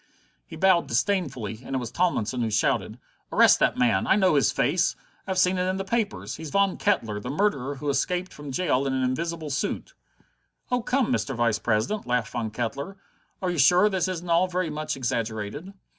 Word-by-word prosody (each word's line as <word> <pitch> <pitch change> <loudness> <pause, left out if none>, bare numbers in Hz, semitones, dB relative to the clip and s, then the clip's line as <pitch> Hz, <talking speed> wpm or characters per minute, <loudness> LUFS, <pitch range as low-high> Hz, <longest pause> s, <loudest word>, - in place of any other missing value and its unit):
He - - -9
bowed 185 -3 +3
disdainfully, 125 - -1
and 135 - -5
it - - +2
was 120 -3 -4
Tomlinson 130 - 0
who 115 - 0
shouted: 105 0 0 0.3
"Arrest - - +6
that - - +2
man! 115 -6 +2
I - - +5
know 190 -4 +3
his 140 -7 +3
face! - - +1 0.3
I've 190 - -2
seen 185 0 +3
it 180 - 0
in 185 - -1
the 195 - -2
papers. 220 0 -2
He's 160 -1 -7
Von 200 +3 +2
Kettler, 115 - 0
the 125 - -6
murderer 145 -5 0
who 145 +2 -6
escaped 180 +6 -1
from 145 -2 -8
jail 140 -3 +1
in 135 - -1
an 130 0 0
invisible 160 +4 -2
suit." 155 +9 -3 0.8
"Oh, 250 0 +2
come, 255 +1 +1
Mr. 135 - -1
Vice 115 -3 +1
president," 120 - -1
laughed 125 -3 0
Von 115 -3 -2
Kettler, 125 - -4 0.5
"are 180 - +1
you 175 - -3
sure 180 +9 +5
this 190 -2 0
isn't 180 -1 -4
all 170 +2 +3
very 180 -3 -2
much 155 -1 -3
exaggerated?" 115 - -3
150 Hz, 195 wpm, -25 LUFS, 125-185 Hz, 0.8 s, Arrest